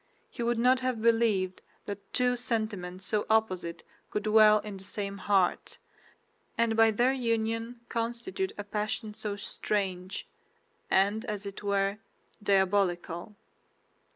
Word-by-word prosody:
He -, -, -7 dB
would 235 Hz, 0 st, +1 dB
not 250 Hz, +2 st, +4 dB
have 255 Hz, -2 st, -1 dB
believed 220 Hz, -5 st, +2 dB, 0.2 s
that 205 Hz, -1 st, -7 dB
two 250 Hz, 0 st, +2 dB
sentiments 210 Hz, -6 st, -3 dB
so 210 Hz, +1 st, 0 dB
opposite 185 Hz, -6 st, +1 dB, 0.3 s
could 210 Hz, -, -2 dB
dwell 215 Hz, 0 st, +6 dB
in 205 Hz, -2 st, -7 dB
the 190 Hz, -, -12 dB
same 200 Hz, 0 st, -4 dB
heart, 195 Hz, -3 st, +1 dB, 0.8 s
and 230 Hz, -1 st, +2 dB
by 225 Hz, 0 st, +6 dB
their 240 Hz, +5 st, +3 dB
union 230 Hz, -1 st, -1 dB
constitute 240 Hz, +13 st, -2 dB
a 205 Hz, -, -4 dB
passion 210 Hz, +1 st, -3 dB
so 210 Hz, -1 st, -2 dB
strange, 195 Hz, -2 st, -3 dB, 0.6 s
and 200 Hz, +3 st, +3 dB
as 210 Hz, -3 st, -4 dB
it 200 Hz, -1 st, -6 dB
were, 200 Hz, 0 st, 0 dB, 0.4 s
diabolical. 190 Hz, -2 st, +1 dB
210 Hz, 125 wpm, -29 LUFS, 195-230 Hz, 0.8 s, dwell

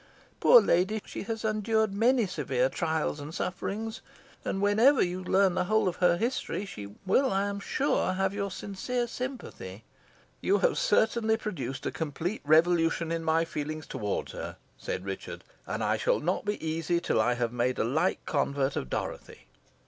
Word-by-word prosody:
Poor -, -, +8 dB
lady! 190 Hz, -, +2 dB
she -, -, -6 dB
has 225 Hz, +1 st, -4 dB
endured 215 Hz, 0 st, +1 dB
many 235 Hz, +3 st, +3 dB
severe -, -, 0 dB
trials 160 Hz, -3 st, -1 dB
and 145 Hz, +3 st, -7 dB
sufferings, 210 Hz, +4 st, -3 dB, 0.4 s
and 195 Hz, -, -2 dB
whenever 220 Hz, +8 st, +5 dB
you 180 Hz, +1 st, -3 dB
learn 190 Hz, 0 st, +3 dB
the 180 Hz, -, 0 dB
whole 215 Hz, +1 st, +2 dB
of 180 Hz, -, -1 dB
her 175 Hz, -1 st, +4 dB
history, 230 Hz, -2 st, -2 dB
she 100 Hz, -, -9 dB
will, 260 Hz, +8 st, +3 dB
I 195 Hz, +1 st, +1 dB
am 200 Hz, 0 st, -3 dB
sure, 260 Hz, -3 st, 0 dB
have 190 Hz, +1 st, 0 dB
your 200 Hz, -1 st, -2 dB
sincere 240 Hz, +6 st, -3 dB
sympathy." 235 Hz, -, -6 dB, 0.6 s
"You 200 Hz, -, +3 dB
have 200 Hz, -, +2 dB
certainly 220 Hz, +1 st, +2 dB
produced 175 Hz, -, -5 dB
a -, -, -1 dB
complete 160 Hz, +6 st, -3 dB
revolution 165 Hz, +1 st, +3 dB
in 165 Hz, 0 st, -1 dB
my 160 Hz, +1 st, +2 dB
feelings 155 Hz, -1 st, -4 dB
towards 105 Hz, -1 st, -3 dB
her," -, -, -6 dB, 0.2 s
said 95 Hz, -, -5 dB
Richard, 95 Hz, -1 st, -6 dB, 0.2 s
"and -, -, -2 dB
I -, -, +1 dB
shall -, -, +1 dB
not 175 Hz, +7 st, -1 dB
be 205 Hz, 0 st, 0 dB
easy 165 Hz, +2 st, 0 dB
till 170 Hz, -, +1 dB
I 120 Hz, +3 st, +2 dB
have 120 Hz, -1 st, -1 dB
made 125 Hz, +1 st, 0 dB
a -, -, +1 dB
like 155 Hz, +11 st, 0 dB
convert 140 Hz, -2 st, 0 dB
of 65 Hz, -, -3 dB
Dorothy." -, -, -5 dB
185 Hz, 170 wpm, -29 LUFS, 155-215 Hz, 0.6 s, Poor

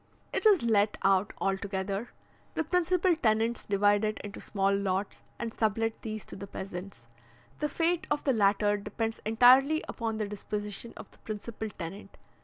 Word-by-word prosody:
It -, -, +3 dB
is 390 Hz, -, +5 dB
let 210 Hz, -2 st, +2 dB
out 195 Hz, +1 st, +3 dB
altogether; 195 Hz, +2 st, -2 dB, 0.5 s
the 320 Hz, -, +1 dB
principal 360 Hz, +2 st, +2 dB
tenants 225 Hz, -4 st, +1 dB
divide 205 Hz, +1 st, +3 dB
it 215 Hz, 0 st, 0 dB
into 205 Hz, -1 st, -7 dB
small 195 Hz, -1 st, +1 dB
lots, 195 Hz, 0 st, -2 dB, 0.2 s
and 230 Hz, -1 st, -4 dB
sublet 225 Hz, +1 st, 0 dB
these 215 Hz, -2 st, -5 dB
to -, -, -9 dB
the 200 Hz, +1 st, -7 dB
peasants. 185 Hz, -10 st, -7 dB, 0.5 s
The 300 Hz, -, 0 dB
fate 335 Hz, +3 st, 0 dB
of 295 Hz, 0 st, 0 dB
the 270 Hz, -, +2 dB
latter 205 Hz, -1 st, +3 dB
depends 225 Hz, +2 st, -3 dB
entirely 260 Hz, +7 st, +6 dB
upon 225 Hz, -2 st, -3 dB
the 215 Hz, -1 st, -2 dB
disposition 210 Hz, +2 st, -5 dB
of -, -, -10 dB
the -, -, -22 dB
principal 220 Hz, +1 st, -5 dB
tenant. 195 Hz, +1 st, -8 dB
215 Hz, 160 wpm, -29 LUFS, 200-235 Hz, 0.5 s, entirely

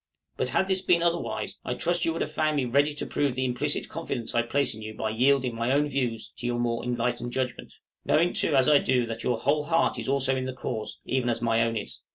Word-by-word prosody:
But -, -, -1 dB
had 190 Hz, -, +1 dB
this 190 Hz, -1 st, +1 dB
been 175 Hz, -2 st, +3 dB
otherwise, 170 Hz, 0 st, -1 dB
I -, -, -2 dB
trust 175 Hz, +1 st, 0 dB
you 165 Hz, -, +2 dB
would 165 Hz, -, -1 dB
have 150 Hz, -, -6 dB
found 155 Hz, 0 st, +1 dB
me 140 Hz, -3 st, +1 dB
ready 140 Hz, +5 st, +3 dB
to -, -, -4 dB
prove 140 Hz, -3 st, 0 dB
the 130 Hz, 0 st, 0 dB
implicit 125 Hz, -1 st, -1 dB
confidence 115 Hz, -2 st, -4 dB
I 120 Hz, -, +3 dB
place 135 Hz, +3 st, 0 dB
in 110 Hz, -, -10 dB
you 110 Hz, 0 st, -7 dB
by 110 Hz, 0 st, -2 dB
yielding 130 Hz, +2 st, +2 dB
my 115 Hz, +2 st, -1 dB
own 145 Hz, +2 st, +3 dB
views 125 Hz, -5 st, -2 dB
to 120 Hz, -, -4 dB
your 120 Hz, 0 st, 0 dB
more 120 Hz, -1 st, -1 dB
enlightened 120 Hz, 0 st, -2 dB
judgment; 125 Hz, -2 st, -3 dB, 0.3 s
knowing 170 Hz, +3 st, +3 dB
too 150 Hz, -, +1 dB
as 130 Hz, -1 st, +4 dB
I 150 Hz, -2 st, +6 dB
do 125 Hz, -2 st, +2 dB
that 115 Hz, 0 st, -5 dB
your 125 Hz, -, +1 dB
whole 145 Hz, +5 st, +1 dB
heart 165 Hz, +1 st, +2 dB
also 135 Hz, -1 st, +2 dB
is 130 Hz, -, +1 dB
in 130 Hz, -, -3 dB
the 130 Hz, -, -3 dB
cause, 115 Hz, -3 st, -5 dB
even 130 Hz, -2 st, 0 dB
as 115 Hz, -, 0 dB
my 115 Hz, -1 st, +2 dB
own 115 Hz, 0 st, +1 dB
is. 105 Hz, -, -6 dB
130 Hz, 250 wpm, -27 LUFS, 120-145 Hz, 0.3 s, I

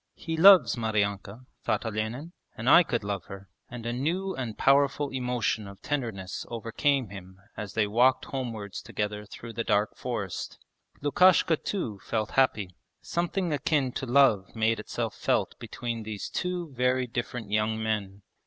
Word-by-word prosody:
'He 165 Hz, -2 st, -4 dB
loves 185 Hz, +1 st, +8 dB
Maryanka,' 105 Hz, 0 st, -2 dB, 0.2 s
thought -, -, 0 dB
Olenin, 110 Hz, +9 st, -3 dB, 0.3 s
'and 115 Hz, -, -5 dB
I 150 Hz, -, +9 dB
could 120 Hz, -, -1 dB
love 100 Hz, -3 st, -3 dB
her,' 95 Hz, 0 st, -10 dB, 0.2 s
and 120 Hz, -1 st, -8 dB
a 120 Hz, -, -1 dB
new 175 Hz, +9 st, -1 dB
and 120 Hz, -5 st, -5 dB
powerful 140 Hz, +1 st, +3 dB
emotion 125 Hz, -4 st, -1 dB
of 100 Hz, 0 st, -11 dB
tenderness 115 Hz, -10 st, -3 dB
overcame 120 Hz, +2 st, 0 dB
him 95 Hz, -1 st, -11 dB, 0.2 s
as 100 Hz, -2 st, -6 dB
they 110 Hz, -, +3 dB
walked 120 Hz, +5 st, +3 dB
homewards 115 Hz, -7 st, -5 dB
together 105 Hz, 0 st, -4 dB
through 115 Hz, +2 st, -9 dB
the 115 Hz, +1 st, -2 dB
dark 105 Hz, 0 st, +1 dB
forest. 105 Hz, -7 st, -4 dB, 0.5 s
Lukashka 170 Hz, +2 st, +5 dB
too 120 Hz, -, -3 dB
felt 110 Hz, -2 st, -2 dB
happy; 105 Hz, -9 st, +1 dB, 0.3 s
something 175 Hz, 0 st, -1 dB
akin 145 Hz, -2 st, +1 dB
to 130 Hz, -, -4 dB
love 120 Hz, -8 st, +3 dB
made 110 Hz, 0 st, +1 dB
itself 110 Hz, -, -3 dB
felt -, -, 0 dB
between 115 Hz, -1 st, -5 dB
these 110 Hz, -2 st, -5 dB
two 180 Hz, -4 st, -3 dB
very 125 Hz, 0 st, +1 dB
different 120 Hz, -3 st, -5 dB
young 110 Hz, +1 st, +1 dB
men. 105 Hz, -3 st, -3 dB
115 Hz, 155 wpm, -28 LUFS, 105-135 Hz, 0.5 s, I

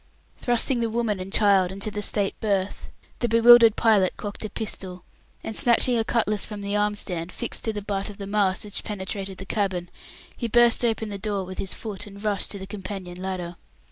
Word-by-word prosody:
Thrusting 245 Hz, +1 st, +2 dB
the 230 Hz, -1 st, 0 dB
woman 220 Hz, -3 st, -1 dB
and 185 Hz, +1 st, -6 dB
child 195 Hz, -4 st, +4 dB
into 200 Hz, +2 st, -2 dB
the 210 Hz, 0 st, -3 dB
state 200 Hz, -1 st, 0 dB
berth, 200 Hz, -2 st, -1 dB, 0.3 s
the 240 Hz, -, 0 dB
bewildered 230 Hz, 0 st, +8 dB
pilot 210 Hz, -5 st, +3 dB
cocked 205 Hz, +1 st, -6 dB
a 215 Hz, -, -3 dB
pistol, 190 Hz, -4 st, -5 dB, 0.4 s
and 220 Hz, -, -4 dB
snatching 240 Hz, +2 st, +4 dB
a 225 Hz, -, +2 dB
cutlass 215 Hz, -3 st, 0 dB
from 210 Hz, -2 st, -5 dB
the 200 Hz, +1 st, -2 dB
arm 210 Hz, 0 st, +1 dB
stand 175 Hz, -3 st, -5 dB
fixed 240 Hz, -, -5 dB
to 220 Hz, -, +1 dB
the 205 Hz, -1 st, -5 dB
butt 200 Hz, 0 st, -2 dB
of 205 Hz, -, -10 dB
the 200 Hz, -, -6 dB
mast 200 Hz, 0 st, +1 dB
which 205 Hz, -, -5 dB
penetrated 195 Hz, -1 st, -5 dB
the 195 Hz, -, -8 dB
cabin, 190 Hz, -4 st, -1 dB, 0.4 s
he 235 Hz, -, -3 dB
burst 240 Hz, +1 st, +4 dB
open 225 Hz, -2 st, 0 dB
the 200 Hz, -1 st, -5 dB
door 200 Hz, -1 st, -2 dB
with 185 Hz, 0 st, -8 dB
his 190 Hz, -, -2 dB
foot, 210 Hz, -2 st, -6 dB
and 200 Hz, 0 st, -10 dB
rushed 205 Hz, -2 st, 0 dB
to 200 Hz, -, -5 dB
the 190 Hz, -, -7 dB
companion 190 Hz, -3 st, -7 dB
ladder. 180 Hz, -2 st, -4 dB
205 Hz, 205 wpm, -25 LUFS, 190-220 Hz, 0.4 s, bewildered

